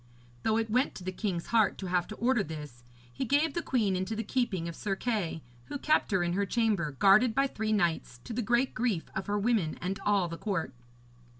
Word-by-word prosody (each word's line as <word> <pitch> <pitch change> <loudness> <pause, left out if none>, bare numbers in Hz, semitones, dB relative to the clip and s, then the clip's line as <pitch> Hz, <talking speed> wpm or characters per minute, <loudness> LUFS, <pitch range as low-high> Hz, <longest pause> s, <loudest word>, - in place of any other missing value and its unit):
Though 220 0 +1
it 225 -1 -1
went 255 +5 +2
to 185 - -8
the 185 - -3
king's 185 -3 -3
heart 220 -4 +4
to 195 - -6
have 180 -1 0
to 215 - -7
order 240 -1 +2
this, 150 -7 -8 0.3
he - - -3
gave 285 +4 +2
the 340 - -1
queen 220 - +1
into 190 +4 -2
the 225 - -2
keeping 200 -8 -1
of 170 - -6
Sir 195 -2 -2
Kay, 195 -8 -2 0.2
who 285 - -5
kept 305 +3 +2
her 190 -3 +2
in 175 0 0
her 200 +2 +1
chamber, 205 - +1
guarded 205 - +5
by 275 +1 +4
three 220 -5 -2
knights, 170 - 0
to - - -6
the 245 - -1
great 240 +4 +1
grief 220 -8 -1
of 195 - -3
her 205 0 0
women 205 -7 +1
and 195 +2 -3
all 200 -3 +2
the 165 0 -7
court. 190 -10 -2
205 Hz, 225 wpm, -30 LUFS, 175-235 Hz, 0.3 s, guarded